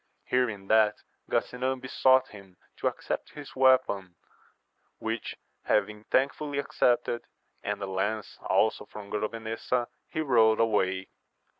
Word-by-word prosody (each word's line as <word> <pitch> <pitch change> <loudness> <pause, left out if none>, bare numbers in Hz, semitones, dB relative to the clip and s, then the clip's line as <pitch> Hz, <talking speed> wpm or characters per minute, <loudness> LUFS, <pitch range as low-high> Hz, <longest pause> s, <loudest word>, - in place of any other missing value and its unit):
Hearing 115 -6 0
that, 110 0 +4 0.3
Gasinan 130 +1 0
besought 130 0 +3
him 95 -3 -14 0.2
to - - 0
accept - - -3
his 145 -2 -10
weapon; 130 -9 +3 0.8
which, 110 0 -4 0.3
having 105 +1 0
thankftdly 140 +2 0
ac 140 - -2
cepted, 120 -1 +3 0.4
and 100 0 -3
a - - 0
lance 95 +3 -2
also - - +1
from 105 -2 -10
Grovenesa, 115 +3 -2 0.2
he 155 - -2
rode 115 -6 +4
away. 95 -4 +1
110 Hz, 120 wpm, -28 LUFS, 105-130 Hz, 0.8 s, that